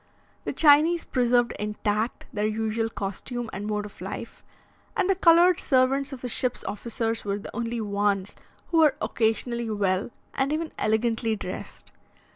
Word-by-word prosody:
The - - -1
Chinese 315 +3 +5
preserved 245 -1 +2
intact 210 +2 -2
their 210 -1 0
usual 220 +1 -1
costume 225 +4 -5
and 205 +2 -4
mode 210 -1 -1
of 210 - -12
life; - - -7 0.5
and 390 -3 +2
the 390 - +4
coloured 350 -1 +5
servants 270 +2 +2
of 265 -2 -7
the 250 - -3
ship's 245 +1 -1
officers 225 +2 -3
were 200 -1 -1
the 205 - -9
only 235 0 -2
ones 200 -1 0 0.3
who 330 - +3
were 305 -4 +5
occasionally 235 +1 0
well 200 -2 0 0.2
and 270 +1 0
even 315 +1 -2
elegantly 225 +1 +1
dressed. 210 - -7
230 Hz, 150 wpm, -26 LUFS, 210-270 Hz, 0.5 s, Chinese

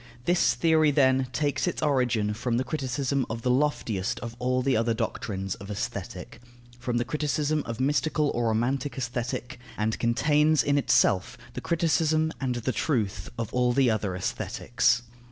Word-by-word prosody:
This 175 +1 +3
theory, 160 -2 +3
then, 130 -2 +3
takes 145 +4 0
its 175 - -2
origin 125 -7 +1
from 115 +2 -1
the 130 - +1
criticism 135 -1 -1
of 115 0 -5
the 125 - +2
loftiest 125 -8 0
of 115 -1 -6
all 125 +1 0
the 135 0 +2
other 115 +1 +1
doctrines 95 -3 -3
of 100 +1 -10
Aesthetic, 105 +2 -5 0.4
from 120 -1 -2
the 120 - 0
criticism 150 0 0
of 115 -1 -5
mystical 145 +2 +1
or 120 0 -1
romantic 130 +6 -1
Aesthetic, 125 0 -4 0.2
and 110 +1 -1
contains 150 +6 +3
in 145 0 +2
itself 125 -3 +2 0.2
the - - -5
criticism 160 -1 +1
and 130 -2 -1
the 120 +2 -1
truth 110 - -1
of 115 -1 -4
all 125 -1 +2
the 130 -2 +3
other 105 -4 -1
Aesthetics. 120 +6 0
125 Hz, 160 wpm, -27 LUFS, 115-145 Hz, 0.4 s, This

